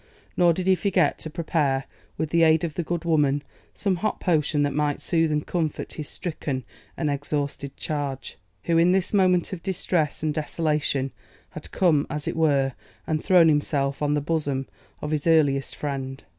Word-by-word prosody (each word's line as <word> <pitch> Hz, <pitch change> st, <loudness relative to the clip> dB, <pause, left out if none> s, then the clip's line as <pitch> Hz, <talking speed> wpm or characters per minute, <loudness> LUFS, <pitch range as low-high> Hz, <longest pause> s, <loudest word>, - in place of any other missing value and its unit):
Nor 175 Hz, -1 st, +5 dB
did 180 Hz, +2 st, -2 dB
he 190 Hz, -, +5 dB
forget 185 Hz, -5 st, +1 dB
to 160 Hz, -, -6 dB
prepare, 150 Hz, -5 st, 0 dB, 0.3 s
with 155 Hz, -1 st, -2 dB
the 170 Hz, -, +3 dB
aid 160 Hz, 0 st, +5 dB
of 165 Hz, -3 st, -2 dB
the 175 Hz, -, -2 dB
good 170 Hz, 0 st, -3 dB
woman, 145 Hz, -3 st, +2 dB, 0.3 s
some 195 Hz, -3 st, 0 dB
hot 215 Hz, +4 st, -2 dB
potion 150 Hz, -4 st, +1 dB
that 145 Hz, -1 st, 0 dB
might 150 Hz, 0 st, 0 dB
soothe 165 Hz, -2 st, +1 dB
and 150 Hz, 0 st, 0 dB
comfort 160 Hz, -4 st, -2 dB
his 150 Hz, -2 st, -6 dB
stricken 145 Hz, -6 st, -4 dB, 0.3 s
and 155 Hz, -, -1 dB
exhausted 140 Hz, -1 st, -3 dB
charge, 140 Hz, -4 st, -4 dB, 0.3 s
who 165 Hz, -1 st, +2 dB
in 175 Hz, +2 st, +5 dB
this 190 Hz, +1 st, 0 dB
moment 185 Hz, -2 st, +3 dB
of 175 Hz, -, -6 dB
distress 170 Hz, -5 st, -1 dB
and 155 Hz, -1 st, +1 dB
desolation 150 Hz, -3 st, -1 dB, 0.4 s
had -, -, -9 dB
come, 160 Hz, -6 st, +2 dB
as 150 Hz, -1 st, -4 dB
it -, -, -2 dB
were, 140 Hz, -5 st, +2 dB, 0.3 s
and 155 Hz, -1 st, -1 dB
thrown 180 Hz, -4 st, +6 dB
himself 145 Hz, -2 st, +1 dB
on 150 Hz, 0 st, +2 dB
the 145 Hz, -, 0 dB
bosom 145 Hz, -3 st, -1 dB, 0.4 s
of 150 Hz, -, -3 dB
his 155 Hz, 0 st, -1 dB
earliest 145 Hz, -4 st, +3 dB
friend. 135 Hz, -2 st, -4 dB
155 Hz, 180 wpm, -25 LUFS, 145-170 Hz, 0.4 s, thrown